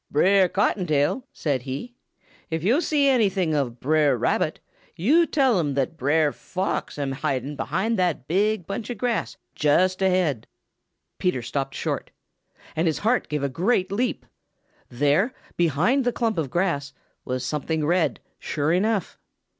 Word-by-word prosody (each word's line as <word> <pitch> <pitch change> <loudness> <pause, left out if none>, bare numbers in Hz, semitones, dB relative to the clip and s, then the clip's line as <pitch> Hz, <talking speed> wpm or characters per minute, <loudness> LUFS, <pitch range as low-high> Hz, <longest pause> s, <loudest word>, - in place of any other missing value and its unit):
"Brer 190 +4 +4
Cottontail," 180 - +1
said 140 -5 -1
he, 140 - -6 0.6
"if 160 -1 -2
yo' 235 - +3
see 295 -4 +2
anything 195 - +2
of 130 -5 -1
Brer 150 -2 +2
Rabbit, - - 0 0.4
yo' 300 - +4
tell 265 - +2
him 145 -5 -1
that 140 +3 -1
Brer 150 0 +2
Fox 185 +1 -3
am 140 -2 -2
hiding 135 +1 -2
behind 190 - -1
that 170 -8 0
big 205 +2 +1
bunch 200 +5 -5
of 245 - -4
grass 235 -4 -1 0.2
just 185 +6 +2
ahead." 180 - +1 0.7
Peter 155 -10 0
stopped 135 +2 -3
short, - - -3 0.7
and 165 +2 +1
his 160 - +1
heart 230 +4 +1
gave 150 -2 -2
a - - +2
great 185 - 0
leap. 245 +5 -1 0.6
There, 145 - +1 0.2
behind 175 - +2
the 245 - +1
clump 225 -6 -1
of 145 -4 -2
grass, 145 -6 -1 0.3
was 130 0 -3
something 150 +3 -1
red, 175 +2 +1 0.2
sure 150 +1 -1
enough. 200 0 0
170 Hz, 145 wpm, -24 LUFS, 145-205 Hz, 0.7 s, Brer